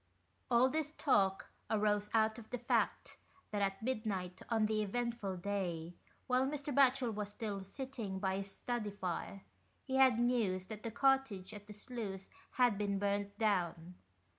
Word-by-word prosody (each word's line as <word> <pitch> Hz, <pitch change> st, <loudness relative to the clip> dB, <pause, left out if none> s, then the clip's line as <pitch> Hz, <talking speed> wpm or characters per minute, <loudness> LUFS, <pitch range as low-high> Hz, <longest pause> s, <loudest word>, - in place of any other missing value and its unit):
All 245 Hz, +1 st, +6 dB
this 305 Hz, +2 st, -2 dB
talk 195 Hz, -11 st, +2 dB, 0.2 s
arose 210 Hz, -1 st, +2 dB
out 220 Hz, 0 st, +2 dB
of 220 Hz, -, -12 dB
the 250 Hz, -, -2 dB
fact 240 Hz, +1 st, 0 dB, 0.3 s
that 205 Hz, -1 st, -1 dB
at 195 Hz, +1 st, 0 dB
midnight 205 Hz, -7 st, -2 dB
on 225 Hz, -2 st, +3 dB
the 215 Hz, 0 st, +1 dB
eventful 220 Hz, -2 st, -2 dB
day, 175 Hz, -3 st, -2 dB, 0.3 s
whilst 260 Hz, +1 st, +2 dB
Mr. 290 Hz, -, -2 dB
Batchel 255 Hz, -3 st, +4 dB
was 210 Hz, -1 st, -3 dB
still 205 Hz, -2 st, -4 dB
sitting 225 Hz, -2 st, -5 dB
by 190 Hz, 0 st, 0 dB
his 195 Hz, 0 st, -4 dB
study 240 Hz, -2 st, -3 dB
fire, 195 Hz, 0 st, -4 dB, 0.4 s
he 265 Hz, -1 st, -1 dB
had 260 Hz, -3 st, +6 dB
news 230 Hz, -7 st, +1 dB
that 215 Hz, +1 st, -7 dB
the 230 Hz, -, -3 dB
cottage 250 Hz, -6 st, +2 dB
at 205 Hz, -1 st, -10 dB
the 210 Hz, -, -8 dB
sluice 205 Hz, -3 st, -6 dB, 0.2 s
had 245 Hz, -5 st, +3 dB
been 200 Hz, -1 st, 0 dB
burnt 200 Hz, 0 st, -1 dB
down. 180 Hz, -5 st, 0 dB
210 Hz, 160 wpm, -36 LUFS, 195-240 Hz, 0.4 s, All